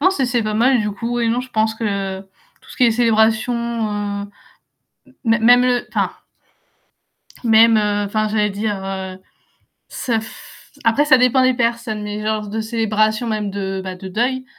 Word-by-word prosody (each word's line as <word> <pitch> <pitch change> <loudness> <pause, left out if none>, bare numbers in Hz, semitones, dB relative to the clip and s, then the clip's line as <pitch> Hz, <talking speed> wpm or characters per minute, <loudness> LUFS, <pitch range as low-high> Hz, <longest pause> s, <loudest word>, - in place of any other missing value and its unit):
non 370 +5 +4
c'est 330 -9 -1
c'est 245 -2 0
pas 215 0 -2
mal 245 +2 +3
du 210 0 -1
coup 235 +4 -3
et 230 - +1
non 240 +2 0
je 255 - -12
pense 220 -1 0
que 200 -4 -3
tout 190 -1 -25
ce - - -11
qui 250 - +5
est 235 - +5
célébration, 220 0 +2 0.7
heu, 200 - -7 1.0
mê 225 0 +3
même 245 +2 +6
le 245 -1 +1
enfin - - -1 1.3
même, 225 0 +6
heu, 205 -1 0
enfin 215 +1 -1
j'allais 210 -1 +1
dire, 205 +1 -2
heu, 190 -1 -5 0.7
ça 230 -3 -2
f 220 - -13
après 235 +6 +3
ça 300 -3 +6
dépend 250 +1 +4
des 255 0 +3
personnes 235 -2 -1
mais 210 0 -5
genre 215 -1 -1
de 220 +2 -3
célébration 220 0 0
même 210 -2 -2
de, 195 -1 -4
bah, 185 -1 -5
de 190 +1 -9
deuil, 255 +7 -1
220 Hz, 180 wpm, -19 LUFS, 210-240 Hz, 1.3 s, même